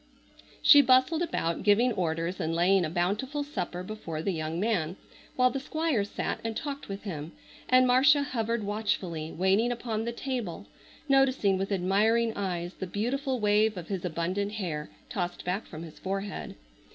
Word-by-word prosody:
She 290 -3 +9
bustled 260 +5 +4
about, 170 - -1
giving 215 +5 +4
orders 170 -1 -2
and 165 +1 -1
laying 180 +2 +3
a - - -3
bountiful 205 - -1
supper 180 - -4
before 180 -6 -5
the 195 - 0
young 160 +1 -3
man, 185 -6 0 0.4
while 255 0 +4
the 275 - -2
Squire 310 -5 0
sat 200 - -3
and 225 -1 -3
talked 280 -4 -5
with 195 0 -6
him, 160 -6 -6 0.4
and 255 0 +6
Marcia 275 +4 +5
hovered 230 -4 -2
watchfully, 190 -6 -2
waiting 195 +7 +2
upon 230 -2 -3
the 235 - -1
table, 235 -7 -4 0.4
noticing 270 -7 +3
with 195 +2 -2
admiring 215 +5 +2
eyes 180 -3 -3
the 190 - -3
beautiful 255 - -1
wave 210 0 +3
of 175 - -7
his 190 -3 -3
abundant 185 +4 -2
hair, 165 -8 -4 0.2
tossed 175 -3 -4
back 185 +4 -2
from 160 -1 -8
his 160 -2 -11
forehead. 195 +1 -4
205 Hz, 165 wpm, -28 LUFS, 175-245 Hz, 0.4 s, She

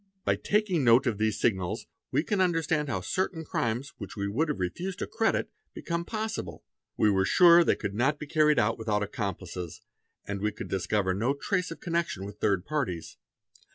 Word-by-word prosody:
By - - +3
taking 200 -7 +1
note 120 +2 +6
of 115 -5 0
these 110 0 +1
signals 95 -6 0 0.2
we 145 +4 +1
can 200 +1 0
understand 165 -4 +1
how 95 -7 -1
certain 165 - -2
crimes 120 +1 -2
which 100 - -7
we 100 - -1
have 130 +4 -1
refused 175 - -3
to - - -2
credit 225 0 0 0.2
become 170 0 -3
possible; 215 - -4 0.3
we 105 - +4
were 95 -1 +2
sure 170 - +7
they - - +3
could 105 -2 -4
not 130 +8 +1
be 150 - -6
carried 150 -1 +3
out 105 +3 +2
without 105 -2 0
accomplices 95 -4 -5 0.5
and 100 -1 -4
we 105 0 0
could 110 - -7
discover 95 0 0
no 120 +9 0
trace 180 +4 -1
of 165 - -8
connection 170 - -2
with 100 0 -9
third 95 -3 +1
parties. 125 - -3
120 Hz, 185 wpm, -28 LUFS, 100-165 Hz, 0.5 s, sure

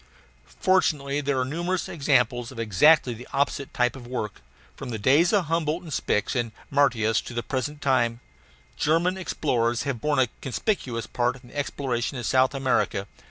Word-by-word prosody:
Fortunately, 145 -6 +2
there 140 -2 0
are 130 - +1
numerous 175 +6 -2
examples 125 -6 +1
of 130 - -12
exactly 120 - +4
the 120 +2 -10
opposite 140 0 0
type 125 +1 +1
of 125 -2 -10
work. 115 - -4 0.3
From 135 - -7
the 115 - -3
days 140 +11 +4
of 200 -5 +2
Humboldt 165 +2 -1
and 160 -4 -7
Spix 105 -2 0
and 120 -3 -1 0.2
Martius 120 -6 +2
to 120 - -9
the 120 - -2
present 145 +2 -3
time, 120 -4 +2 0.6
German 165 +4 +2
explorers 120 -10 0
have 135 -6 -3
borne 150 -1 +1
a 130 -3 +3
conspicuous 130 - -2
part 125 +1 -1
in 120 - -15
the - - -16
exploration 135 -3 -2
of 120 - -4
South 130 +3 +3
America. 130 -7 0
130 Hz, 170 wpm, -25 LUFS, 120-150 Hz, 0.6 s, exactly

